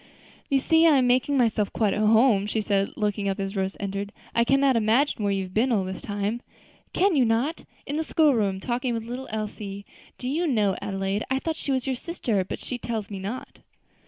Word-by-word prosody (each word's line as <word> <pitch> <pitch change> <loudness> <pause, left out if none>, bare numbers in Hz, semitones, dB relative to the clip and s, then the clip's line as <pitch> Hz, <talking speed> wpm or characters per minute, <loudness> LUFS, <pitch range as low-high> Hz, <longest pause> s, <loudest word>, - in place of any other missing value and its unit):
"You 275 - +3
see 320 +4 +4
I 300 -3 +6
am 255 - +3
making 255 +3 +2
myself 220 -5 +2
quite 210 -4 +1
at - - -2
home," 215 -1 +4
she 220 - -1
said, 200 -2 +1
looking 205 -2 -1
up 195 +1 -2
as 195 +1 -3
Rose 190 0 -2
entered. 200 0 -4 0.2
"I 235 - +3
cannot 275 +2 +3
imagine 230 +2 +2
where 200 - +1
you 195 -1 0
have 185 0 -9
been 240 +5 +2
all 205 -5 +2
this 185 0 -6
time." 205 +3 -3 0.5
"Can 385 -2 +2
you 270 - +4
not? 240 +8 0 0.2
In 290 - -3
the 320 - 0
school 310 -2 +3
room, 200 -5 0
talking 240 +3 -2
with 225 - -3
little 250 +3 -6
Elsie. 205 -2 -5 0.3
Do 250 - -5
you 325 +6 0
know, 210 -8 +2
Adelaide, 195 +1 -2
I 265 - +1
thought 320 +4 -2
she 285 - -4
was 260 -2 0
your 265 -1 0
sister; 240 - -2
but 185 - -6
she 250 - -5
tells 220 -4 -4
me 195 - -5
not." 210 +7 -6
225 Hz, 220 wpm, -25 LUFS, 200-265 Hz, 0.5 s, I